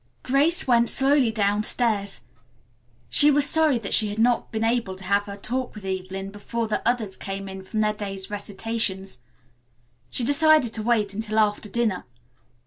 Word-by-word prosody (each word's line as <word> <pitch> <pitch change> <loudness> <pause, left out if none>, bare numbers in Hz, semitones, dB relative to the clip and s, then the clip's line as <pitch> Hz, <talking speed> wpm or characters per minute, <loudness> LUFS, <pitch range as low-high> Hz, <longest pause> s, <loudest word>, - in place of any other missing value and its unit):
Grace 285 +7 +3
went 235 -2 +3
slowly 275 -2 +3
downstairs. 210 0 0 0.9
She 295 - +5
was 290 0 +3
sorry 315 -5 +3
that 220 -4 -4
she 215 - +3
had 205 - -6
not 235 +1 +1
been 220 0 -2
able 225 -4 -1
to 190 - -12
have 200 +2 +1
her 200 -1 -8
talk 245 +4 -3
with 210 -2 -10
Evelyn 190 +1 -5
before 225 +3 -4
the 215 - -2
others 220 -6 -2
came 195 +1 -6
in 190 0 -8
from 215 +3 -3
their 215 0 +1
day's 195 -2 -6
recitations. 200 - -3 0.9
She 245 - +1
decided 285 -2 +4
to 220 - +2
wait 215 -3 0
until 215 +1 -4
after 210 0 +1
dinner. 225 -5 -1
215 Hz, 165 wpm, -24 LUFS, 200-240 Hz, 0.9 s, She